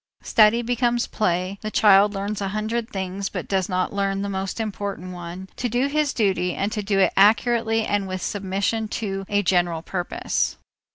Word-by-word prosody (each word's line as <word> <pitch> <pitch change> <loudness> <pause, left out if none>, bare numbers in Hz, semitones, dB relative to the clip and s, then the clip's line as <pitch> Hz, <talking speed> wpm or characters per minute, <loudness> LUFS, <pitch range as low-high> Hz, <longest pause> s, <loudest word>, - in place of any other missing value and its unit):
Study 225 +2 +4
becomes 240 0 +1
play, 185 -1 -1
the 215 - -3
child 205 -1 +5
learns 200 +1 -3
a 195 - -1
hundred 220 +3 -2
things 195 -2 -4
but - - -5
does 190 -1 0
not 185 +1 -1
learn 195 0 -1
the 200 - -3
most 190 +2 -3
important 200 -4 -4
one, 175 +2 -7
to 245 - -1
do 245 +4 +1
his 295 0 +1
duty 190 -5 0
and 200 +2 -1
to 215 -2 -2
do 200 -1 0
it 195 - +3
accurately 225 +2 +3
and 205 -1 0
with 185 0 -4
submission 200 +3 -1
to 195 -3 -4
a 205 0 +1
general 175 -3 +1
purpose. 180 -1 -2
200 Hz, 180 wpm, -23 LUFS, 190-220 Hz, -, child